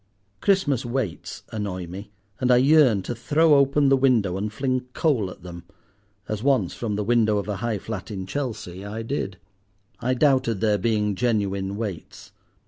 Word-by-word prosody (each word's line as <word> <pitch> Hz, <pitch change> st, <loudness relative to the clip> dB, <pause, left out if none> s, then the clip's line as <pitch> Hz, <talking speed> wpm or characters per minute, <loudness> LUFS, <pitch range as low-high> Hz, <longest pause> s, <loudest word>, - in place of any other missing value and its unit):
Christmas 185 Hz, -, +2 dB
Waits 120 Hz, -7 st, -4 dB
annoy 100 Hz, -4 st, -4 dB
me, 95 Hz, +4 st, -9 dB, 0.3 s
and 125 Hz, -, 0 dB
I 125 Hz, -, +6 dB
yearn 130 Hz, -6 st, +5 dB
to 120 Hz, -, -3 dB
throw 150 Hz, +7 st, +3 dB
open 140 Hz, 0 st, +4 dB
the 135 Hz, -, +6 dB
window 120 Hz, -9 st, +2 dB
and 105 Hz, +2 st, -3 dB
fling 130 Hz, +1 st, -2 dB
coal 125 Hz, -, +1 dB
at 90 Hz, -, -12 dB
them—as 100 Hz, +4 st, -10 dB
once 135 Hz, 0 st, +2 dB
from 110 Hz, -4 st, -3 dB
the 105 Hz, -, -1 dB
window 110 Hz, -1 st, +2 dB
of 100 Hz, -1 st, -3 dB
a 105 Hz, -2 st, -2 dB
high 115 Hz, -1 st, -2 dB
flat 105 Hz, +1 st, -6 dB
in 95 Hz, -3 st, -5 dB
Chelsea 100 Hz, -6 st, -5 dB
I 105 Hz, +3 st, -5 dB
did. 110 Hz, -6 st, -3 dB, 0.6 s
I 125 Hz, +1 st, 0 dB
doubted 130 Hz, -6 st, +2 dB
their 105 Hz, -1 st, +2 dB
being 105 Hz, 0 st, +1 dB
genuine 100 Hz, -4 st, -1 dB
Waits. 105 Hz, -6 st, -6 dB
110 Hz, 165 wpm, -24 LUFS, 100-130 Hz, 0.6 s, I